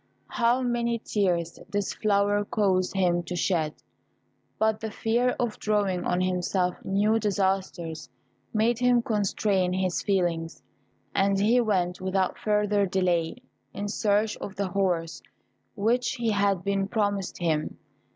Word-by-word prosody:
How 240 Hz, +2 st, +2 dB
many 235 Hz, -1 st, 0 dB
tears 180 Hz, -7 st, -1 dB
this 205 Hz, -1 st, -1 dB
flower 205 Hz, -1 st, +2 dB
caused 195 Hz, -3 st, 0 dB
him 175 Hz, -2 st, +2 dB
to 175 Hz, +1 st, -6 dB
shed. 165 Hz, -3 st, 0 dB, 0.8 s
But 220 Hz, 0 st, +1 dB
the 220 Hz, -, -4 dB
fear 235 Hz, +4 st, 0 dB
of 240 Hz, -3 st, -2 dB
drawing 200 Hz, -4 st, 0 dB
on 180 Hz, 0 st, +1 dB
himself 180 Hz, 0 st, -1 dB
new 210 Hz, +3 st, +2 dB
disasters 190 Hz, -, -1 dB, 0.4 s
made 225 Hz, +2 st, +1 dB
him 245 Hz, -1 st, +3 dB
constrain 200 Hz, -4 st, 0 dB
his 185 Hz, -1 st, 0 dB
feelings, 175 Hz, -4 st, -1 dB, 0.5 s
and 195 Hz, 0 st, +2 dB
he 230 Hz, +5 st, +4 dB
went, 185 Hz, -6 st, 0 dB
without 190 Hz, 0 st, 0 dB
further 210 Hz, -1 st, +1 dB
delay, 180 Hz, +3 st, 0 dB, 0.3 s
in 205 Hz, -, -3 dB
search 210 Hz, +1 st, +1 dB
of 195 Hz, -, -7 dB
the 195 Hz, 0 st, -2 dB
horse 175 Hz, -3 st, -1 dB, 0.5 s
which 240 Hz, +4 st, +1 dB
had 200 Hz, -3 st, +1 dB
been 195 Hz, -1 st, 0 dB
promised 205 Hz, -3 st, -1 dB
him. 160 Hz, -3 st, -1 dB
200 Hz, 130 wpm, -26 LUFS, 180-215 Hz, 0.8 s, he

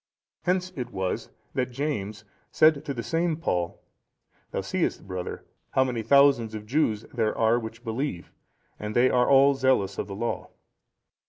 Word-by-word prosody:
Hence 185 Hz, 0 st, +1 dB
it 125 Hz, -3 st, -4 dB
was, 95 Hz, -1 st, -3 dB, 0.2 s
that 125 Hz, -1 st, -1 dB
James 110 Hz, -6 st, -3 dB, 0.3 s
said 155 Hz, -2 st, +4 dB
to 145 Hz, -, -3 dB
the 115 Hz, -, -4 dB
same 165 Hz, +6 st, 0 dB
Paul, 90 Hz, -, -2 dB, 0.7 s
'Thou -, -, -2 dB
seest, -, -, -2 dB
brother, 90 Hz, -1 st, -5 dB, 0.3 s
how 130 Hz, -, +4 dB
many 125 Hz, -3 st, -2 dB
thousands 135 Hz, -3 st, +4 dB
of 105 Hz, -1 st, -7 dB
Jews 115 Hz, -4 st, 0 dB
there 110 Hz, -3 st, 0 dB
are 115 Hz, +1 st, +3 dB
which 115 Hz, +1 st, -8 dB
believe; 115 Hz, -5 st, -3 dB, 0.5 s
and 105 Hz, 0 st, -5 dB
they 125 Hz, +2 st, +5 dB
are 125 Hz, 0 st, +3 dB
all 140 Hz, +1 st, +6 dB
zealous 130 Hz, -8 st, +1 dB
of -, -, -2 dB
the 100 Hz, -, -6 dB
Law. 115 Hz, +3 st, -3 dB
120 Hz, 160 wpm, -26 LUFS, 105-140 Hz, 0.7 s, all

